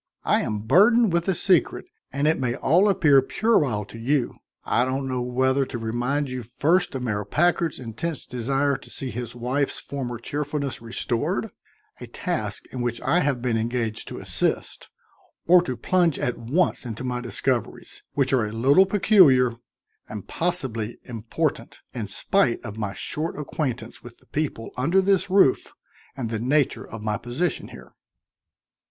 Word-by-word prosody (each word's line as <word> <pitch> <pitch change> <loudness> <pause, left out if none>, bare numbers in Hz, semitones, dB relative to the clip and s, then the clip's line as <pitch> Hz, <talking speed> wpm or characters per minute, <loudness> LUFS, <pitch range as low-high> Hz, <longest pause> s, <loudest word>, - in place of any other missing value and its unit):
"I - - +2
am 105 -1 -3
burdened 210 - +5
with 170 +1 +1
a 190 - +2
secret, 185 -3 +2 0.3
and 140 +2 0
it 160 - +2
may 125 -2 -1
all 180 +11 +3
appear 145 -8 +5
puerile 135 - +1
to 115 - -11
you. 130 +1 0 0.3
I 120 - +2
don't 135 +1 -2
know 130 -1 -2
whether 130 +2 +1
to 125 - -5
remind 120 +5 -1
you 130 0 -4
first 155 +9 +1
of 130 - -3
Mayor 105 -4 -1
Packard's 170 - +1
intense 125 +6 -5
desire 135 +3 0
to - - -15
see 130 -2 -4
his 120 +1 -6
wife's 130 +4 -1
former 125 -4 -5
cheerfulness 145 +2 -3
restored 115 0 -2 0.5
a - - -8
task - - -3
in 125 - -3
which 120 -1 -2
I 140 +8 +2
have 140 -7 0
been 120 -3 +1
engaged 115 -1 -2
to - - -7
assist - - -2 0.6
or 180 +1 +7
to 130 -8 -4
plunge 175 +4 +2
at 125 - -1
once 145 +11 0
into 120 0 -6
my 125 -1 -2
discoveries, 120 -1 -2
which 135 -1 +1
are 120 -5 +2
a - - -6
little 135 - +4
peculiar 160 - +5 0.5
and 105 -3 -7
possibly 130 -11 -2
important, 125 +6 -3 0.2
in 115 -5 -4
spite 120 - +2
of 105 +1 -7
my 105 -2 -2
short 155 +9 -4
acquaintance 130 -5 -4
with 120 -1 -13
the - - -26
people 145 -7 -3
under 160 +10 +2
this 190 0 +2
roof 190 -8 +3 0.5
and 115 -4 -3
the 110 - -2
nature 140 +4 +1
of 110 -1 -8
my 105 0 -1
position 130 +6 -2
here." - - -13
130 Hz, 165 wpm, -24 LUFS, 120-155 Hz, 0.6 s, or